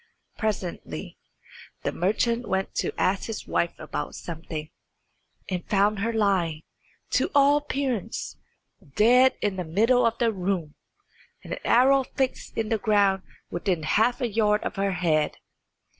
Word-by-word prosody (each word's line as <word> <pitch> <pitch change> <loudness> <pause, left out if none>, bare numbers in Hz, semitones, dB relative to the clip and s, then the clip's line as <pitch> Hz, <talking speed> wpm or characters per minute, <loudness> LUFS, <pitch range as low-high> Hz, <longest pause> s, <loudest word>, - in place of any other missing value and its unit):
Presently 205 -5 -4 0.6
the - - 0
merchant 230 +6 0
went 190 0 -1
to - - -1
ask 190 +1 +1
his 225 -2 -5
wife 170 - 0
about - - -5
something, 160 -2 -6 0.8
and 180 -2 -4
found 205 0 +2
her 225 +3 0
lying, 185 -8 +1 0.5
to - - +2
all 285 +1 +6
appearance, 265 -7 -3 0.6
dead 250 +4 +5
in 205 -2 0
the 180 - -2
middle 225 +10 +3
of 230 0 +2
the 235 -1 +2
room, 180 -5 -2 0.7
and - - -6
an - - -5
arrow 265 +3 +5
fixed 260 0 -3
in 220 -1 -1
the 225 - +1
ground 200 -3 +3 0.3
within 175 -1 -1
half 225 - +2
a 245 - +1
yard 210 -1 +2
of - - -3
her 195 -1 0
head. 160 -4 +1
210 Hz, 145 wpm, -26 LUFS, 180-230 Hz, 0.8 s, all